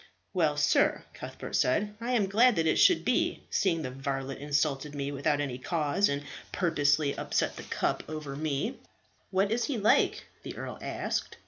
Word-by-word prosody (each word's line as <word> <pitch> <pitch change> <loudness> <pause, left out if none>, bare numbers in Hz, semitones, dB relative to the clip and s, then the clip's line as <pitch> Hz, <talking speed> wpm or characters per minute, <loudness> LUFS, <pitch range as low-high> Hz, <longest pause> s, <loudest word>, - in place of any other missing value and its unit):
"Well, 155 -5 +2
sir," 150 - +3
Cuthbert - - -7
said, 205 +12 +2
"I 245 +2 -1
am 220 -5 +3
glad 225 +5 +4
that 165 -2 +1
it 160 - +2
should 360 -3 +5
be, - - +1
seeing 165 -5 +1
the 130 - -4
varlet 135 0 -4
insulted 145 0 -1
me 140 0 -3
without 145 +1 0 0.2
cause, 165 +5 +1
and 140 0 -2 0.3
purposely 145 -4 +2
upset - - -1
the - - -7
cup - - -1
over 155 -3 -5
me." 145 -1 -2 0.5
"What 195 +2 +1
is 235 +1 +1
he 280 - -2
like?" 210 0 +3 0.2
the - - -8
earl - - -6
asked. - - -3
155 Hz, 165 wpm, -29 LUFS, 140-195 Hz, 0.5 s, should